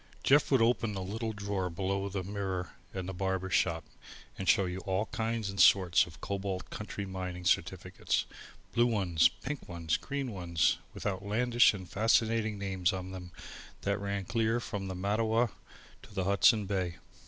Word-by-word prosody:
Jeff 145 +2 +5
would 130 -5 +4
open 115 -2 +2
the 95 - -3
little 110 +4 -3
drawer 100 -3 -2
below 95 +3 -2
the 95 -1 -3
mirror 95 -2 -3 0.2
in 95 -2 -4
the 95 - -5
barber 95 0 -2
shop 80 -3 +2 0.5
and 95 - -2
show 100 -4 +5
you 90 +1 -4
all 95 +2 -1
kinds 115 -1 -2
and 100 0 -5
sorts 90 -2 +6
of - - -13
Cobalt 100 -2 -4
country 105 -1 -5
mining 90 -2 -5
certificates, - - 0 0.5
blue 120 +1 +4
ones, 90 -8 +3
pink 130 +11 -7
ones, 85 -2 -1
green 140 -3 -4
ones, 85 -5 +1 0.2
with - - -8
outlandish 110 +4 +3
and 95 -2 -8
fascinating 110 +1 +2
names 95 -2 0
on 95 -1 -5
them 90 -2 -8 0.5
that 100 0 0
ran 100 -1 -2
clear 115 +3 +1
from 105 -4 -4
the 95 - -4
Mattawa 110 +5 +1 0.5
to 100 - -15
the 95 - 0
Hudson 100 +3 +4
Bay. 95 -3 -1
100 Hz, 165 wpm, -31 LUFS, 95-110 Hz, 0.5 s, sorts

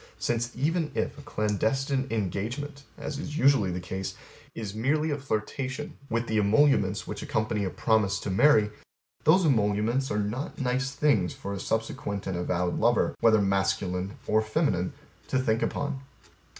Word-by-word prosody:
Since 120 +1 -1
even 155 +5 0
if - - -1
A - - -11
clandestine 135 +3 0
engagement 115 - -3
(as 145 -2 -5
is 150 -1 -5
usually 135 - +4
the 90 0 -3
case) 95 +1 -5 0.4
is 105 -4 -5
merely 150 +8 +1
a 145 - 0
flirtation 130 +3 -3
with 115 +1 0
the 110 -2 +1
emoluments 105 -2 +3
which - - -6
accompany 110 -1 -1
a - - -1
promise 100 -1 +1
to 100 - -3
marry, 105 0 +5 0.5
those 175 +4 +6
emoluments 115 0 +2
are 105 - -1
not 105 +7 -3
nice 130 0 0
things 135 -10 +1
for 100 - -5
a 100 - -4
subsequent 100 -2 -2
and 95 - -2
avowed 90 0 -1
lover, 120 +2 +3
whether 110 -2 +5
masculine 95 -1 0
or 110 0 +3
feminine, 110 - 0 0.3
to - - 0
think 115 -3 +1
upon. 145 -1 -2
110 Hz, 155 wpm, -28 LUFS, 100-135 Hz, 0.5 s, those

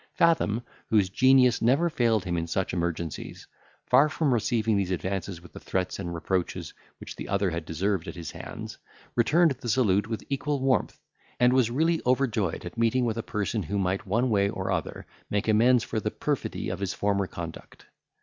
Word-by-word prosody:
Fathom, 140 -9 +2 0.3
whose 105 -5 +3
genius 130 +1 +5
never 135 +9 +3
failed 115 - +1
him 85 -1 -1
in 85 0 -2
such 95 +2 -1
emergencies, 85 -3 -4 0.4
far 150 +2 +5
from 150 -3 +1
receiving 115 -1 +1
these 100 -2 0
advances 95 +1 -3
with 90 - -15
the - - -8
threats 95 0 -2
and 85 -3 -4
reproaches 90 +1 -2 0.3
which - - -8
the - - -7
other 100 -2 +1
had 85 -1 -4
deserved 90 +2 -1
at - - -6
his 85 -4 -6
hands, - - -8 0.4
returned 155 +8 +4
the 125 -2 -5
salute 105 -5 +2
with 115 -1 -4
equal 145 +1 -1
warmth, 130 -3 0 0.4
and 125 +1 +5
was 130 -3 +3
really 160 +6 +1
overjoyed 120 -8 0
at 90 +6 -7
meeting 115 +2 +2
with 115 -1 -1
a - - 0
person 105 0 -2
who 100 +4 -3
might 95 +2 -1
one 115 +6 +1
way 100 -1 +3
or - - -3
other - - -3 0.2
make 105 +1 -1
amends 115 +2 +4
for 110 - -2
the - - -1
perfidy - - -3
of - - -4
his 100 -2 -2
former 100 -1 0
conduct. 85 -2 -9
105 Hz, 190 wpm, -27 LUFS, 95-125 Hz, 0.4 s, genius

